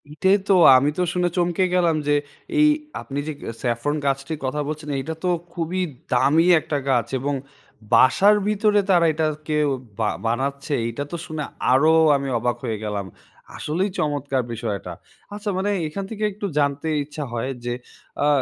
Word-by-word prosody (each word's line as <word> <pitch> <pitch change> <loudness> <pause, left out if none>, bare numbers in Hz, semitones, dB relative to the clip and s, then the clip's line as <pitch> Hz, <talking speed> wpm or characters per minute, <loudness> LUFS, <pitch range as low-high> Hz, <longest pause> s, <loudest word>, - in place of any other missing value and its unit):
এটাই 190 +7 +3
তো! - - +6 0.2
আমি 140 +3 +2
তো - - +1
শুনে 180 -1 +1
চমকে 175 +1 +1
গেলাম 170 -3 +3
যে, 145 - +4 0.4
এই 300 - +7 0.3
আপনি 140 +1 -5
যে 155 - -2 0.3
স্যাফরন 120 +5 0
গাছটির 140 +3 -1
কথা 150 +3 -1
বলছেন, 155 0 -5
এইটা 160 +4 -4
তো 180 - +1 0.2
খুবই 175 +2 -2 0.3
দামি 145 +6 +4
একটা 150 -1 -3
গাছ 125 -3 +2
এবং 140 +3 -1 0.6
বাসার 200 +11 +6
ভিতরে 210 0 +3
তারা 175 -3 +5
এটাকে 155 0 -1 0.4
বা 110 -2 +2 0.2
বানাচ্ছে। 140 +5 -1
এইটা 115 +5 -3
তো - - -3
শুনে 155 -1 -4 0.3
আরও 140 +5 +5 0.2
আমি 140 -1 -2
অবাক 120 +1 -1
হয়ে 115 -3 -2
গেলাম। 105 -2 -3 0.5
আসলেই 180 +7 -1
চমৎকার 145 -3 0
বিষয় 115 -2 -3
এটা। 90 - -8 0.4
আচ্ছা, 205 +1 -4
মানে 195 +2 0 0.2
এখান 195 +6 -5
থেকে 215 -1 -5
একটু 205 +1 -6
জানতে 140 +1 0 0.2
ইচ্ছা 150 +1 -6
হয় 120 +3 -2
যে, 120 - -1 0.5
আ - - +4
150 Hz, 165 wpm, -22 LUFS, 135-175 Hz, 0.6 s, এই